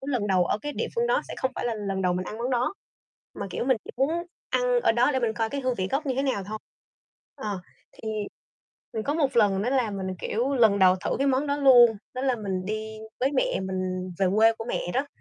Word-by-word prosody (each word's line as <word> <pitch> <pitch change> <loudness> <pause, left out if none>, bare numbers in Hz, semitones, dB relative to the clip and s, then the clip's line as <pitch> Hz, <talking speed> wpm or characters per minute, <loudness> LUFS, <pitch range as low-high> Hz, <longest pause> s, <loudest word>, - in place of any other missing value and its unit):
lần 255 -6 -1
đầu 185 -2 +3
ở 205 - 0
cái 295 0 -3
địa - - -2
phương 470 +1 +1
đó - - +2
sẽ - - -5
không 260 - 0
phải - - -3
là 230 - -1
lần 195 -2 -3
đầu 180 - +2
mình 180 +1 -2
ăn 215 - -6
món 245 +3 -2
đó. 250 +8 0 0.6
Mà, - - -5
kiểu, - - -2
mình 260 -1 +3
chỉ - - -8
muốn 270 +4 +2 0.4
ăn - - +2
ở - - +4
đó 240 +4 +3
để 260 - 0
mình 225 -3 0
coi 225 0 -1
cái 280 - -2
hương 255 -2 0
vị 185 -2 -2
gốc 285 +3 -1
như 265 - 0
thế 270 - 0
nào 260 -8 -1
thôi. 215 +1 -5 0.8
Ờ, 210 -8 -4 0.3
thì 220 - -8 0.9
mình 220 - -1
có 290 - 0
một 285 -6 0
lần 200 -3 +4
nữa 245 - 0
là 250 -5 +1
mình, 195 -1 -4
kiểu, 255 +6 -1
lần 220 -5 +4
đầu 185 -1 +6
thử - - 0
cái 275 - +1
món 270 +2 +2
đó 285 0 0
luôn. 245 -5 +7 0.2
Đó 255 - -3
là 260 -3 +1
mình 190 -4 -3
đi 215 +1 -4 0.2
với 270 +2 +2
mẹ - - +1
mình 185 -1 -3
về 195 - +3
quê 225 +1 +6
của 225 - -5
mẹ - - -1
đó, 275 +3 +1
235 Hz, 255 wpm, -26 LUFS, 200-270 Hz, 0.9 s, luôn